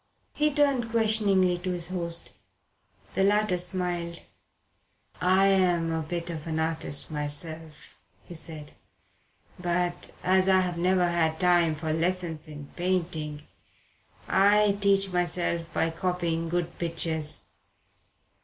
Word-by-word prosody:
He 300 0 +2
turned 280 -5 +2
questioningly 210 -5 +2
to 185 +1 -4
his 175 -1 -1
host. 170 -2 -4 0.8
The 195 - +1
latter 205 -2 +2
smiled. 175 -2 -3 1.0
"I'm 185 -2 +3
a 160 0 -1
bit 170 +2 -3
of 160 -1 -6
an 160 -1 -2
artist 160 -2 -1
myself," 155 +1 -5 0.2
he - - -11
said. 155 -2 -7 0.9
"But 175 0 -1
as 190 +1 +3
I've 185 -2 +2
never 180 0 +3
had 160 -2 +1
time 175 -3 +4
for 155 0 -2
lessons 165 -1 -1
in 145 -2 -9
painting, 165 -5 -2 0.8
I 205 +1 +4
teach 195 -1 +3
myself 170 -1 -1
by 165 - +1
copying 165 -1 -1
good 175 0 -2
pictures. 165 -2 -3
175 Hz, 115 wpm, -27 LUFS, 165-185 Hz, 1.0 s, time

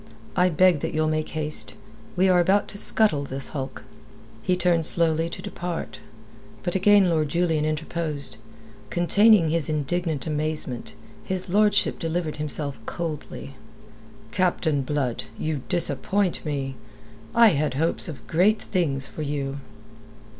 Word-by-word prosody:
I 180 +1 +4
beg 180 -1 +4
that - - -4
you'll 155 0 +1
make 155 0 -1
haste. 130 -9 +2 0.4
We 185 +2 +3
are 180 -1 +4
about 195 +4 +2
to 200 - -2
scuttle 205 -12 +3
this 135 -1 -5
hulk." 135 -2 -6 0.6
He 180 +10 +1
turned 170 -3 +2
slowly 165 -1 +3
to - - -7
depart. 175 -10 -5 0.6
But 175 - -2
again 200 0 +5
Lord 155 -3 +1
Julian 165 -1 +1
interposed. 155 -4 -3 0.5
Containing 180 - +4
his 160 -2 0
indignant 155 +1 -1
amazement, 150 -5 -3 0.3
his 185 -1 0
lordship 205 +1 +3
delivered 165 -1 -2
himself 145 -4 -4
coldly. 155 -4 -5 0.8
"Captain 160 -4 +1
Blood, 130 -5 -2
you 155 -3 -2
disappoint 185 +2 0
me. 140 -3 -3 0.6
I 230 -1 +7
had 150 -6 0
hopes 160 +4 +1
of 150 - -9
great 195 +7 +2
things 140 -8 -1
for - - -8
you." 140 -2 -3
160 Hz, 130 wpm, -24 LUFS, 145-180 Hz, 0.8 s, I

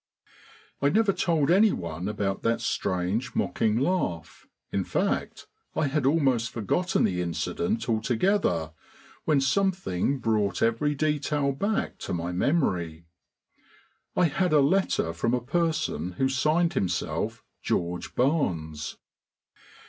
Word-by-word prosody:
I 140 - +4
never 210 +3 +3
told 165 -5 +1
anyone 95 - +2
about 100 -2 -2
that 115 0 +1
strange, 95 +6 -1
mocking 110 -5 +1
laugh, 125 - -2 0.2
in 100 - 0
fact, - - -2 0.3
I 155 - +1
had 140 -1 +1
almost 135 -6 +2
forgotten 180 - 0
the 90 -1 +1
incident 90 +6 -2
altogether 110 - +1 0.5
when 150 -3 +3
something 140 - +1
brought 105 -6 0
every 130 +6 +1
detail 150 -1 0
back 200 +10 -2
to - - -3
my 85 +1 -3
memory. 90 - 0 1.1
I 180 - +4
had 175 +2 +1
a 150 - +6
letter 140 - +2
from 115 +8 0
a - - 0
person 155 - -1
who 130 +8 +1
signed 155 +6 +2
himself 90 -2 -2 0.2
"George 85 0 -2
Barnes." 85 - -1
130 Hz, 120 wpm, -27 LUFS, -, 1.1 s, a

